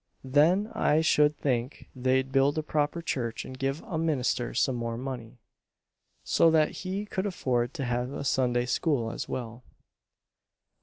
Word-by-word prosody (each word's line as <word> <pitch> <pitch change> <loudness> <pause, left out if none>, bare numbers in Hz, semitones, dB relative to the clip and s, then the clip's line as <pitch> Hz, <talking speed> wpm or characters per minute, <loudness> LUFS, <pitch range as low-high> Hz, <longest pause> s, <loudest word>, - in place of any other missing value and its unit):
"Then 165 +11 +3
I 155 +2 +2
should 150 -2 +3
think 125 -1 -2
they'd 130 +1 +1
build 135 +2 +3
a 155 - 0
proper 150 +2 -1
church 120 -7 -3
and 130 - -8
give 135 +3 -2
a 185 -9 -4
minister 135 -6 0
some 130 - +2
more 115 -1 -3
money, 125 -2 -6 0.9
so 165 - +4
that 155 -1 +3
he 195 +2 -4
could 200 -1 -2
afford 125 -8 -1
to 135 - -3
have 125 +1 -1
a 140 - -5
Sunday 125 -2 +1
School 125 -3 0
as - - -6
well." 120 -1 -5
135 Hz, 155 wpm, -28 LUFS, 125-155 Hz, 0.9 s, so